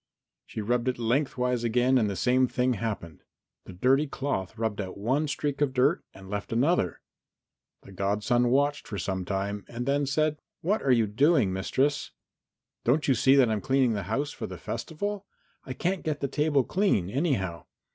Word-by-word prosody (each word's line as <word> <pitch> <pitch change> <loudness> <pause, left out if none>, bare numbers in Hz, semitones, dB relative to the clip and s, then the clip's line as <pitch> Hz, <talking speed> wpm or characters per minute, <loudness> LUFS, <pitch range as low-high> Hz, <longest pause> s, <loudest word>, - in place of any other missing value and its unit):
She 110 - -5
rubbed 120 +3 0
it 130 - 0
lengthwise 125 0 0
again 125 +3 +3
and 110 -3 +1
the 100 - -3
same 130 +4 +3
thing 125 +1 +1
happened. 100 -8 -5 0.4
The - - -10
dirty 135 +10 +2
cloth 115 -8 -3
rubbed 110 -2 -1
out 95 -1 -7
one 130 +9 0
streak 145 0 -2
of 140 -3 +2
dirt 140 +7 +3
and 95 0 -13
left 105 +1 -5
another. 120 - +1 0.8
The - - -13
godson 105 +6 +1
watched 145 +3 +1
for 105 - -5
some 95 0 -2
time 100 +1 -2
and 120 +1 -5
then 140 +1 +1
said, 155 +2 +1 0.2
"What 205 +6 +1
are 140 - -1
you 115 -3 +5
doing, 125 - +3
mistress?" 140 +9 0 0.7
"Don't 145 +6 +2
you 135 - +5
see 130 +3 +4
that 130 -4 +5
I'm 105 -2 -1
cleaning 130 -1 +2
the 105 - -2
house 140 +6 -1
for - - -6
the - - -8
festival? 195 - -4 0.4
I 130 - -5
can't 180 +7 -1
get 155 -2 -2
the 140 - -1
table 145 -1 +2
clean, 180 - +1
anyhow. 115 - -1
125 Hz, 180 wpm, -27 LUFS, 105-145 Hz, 0.8 s, you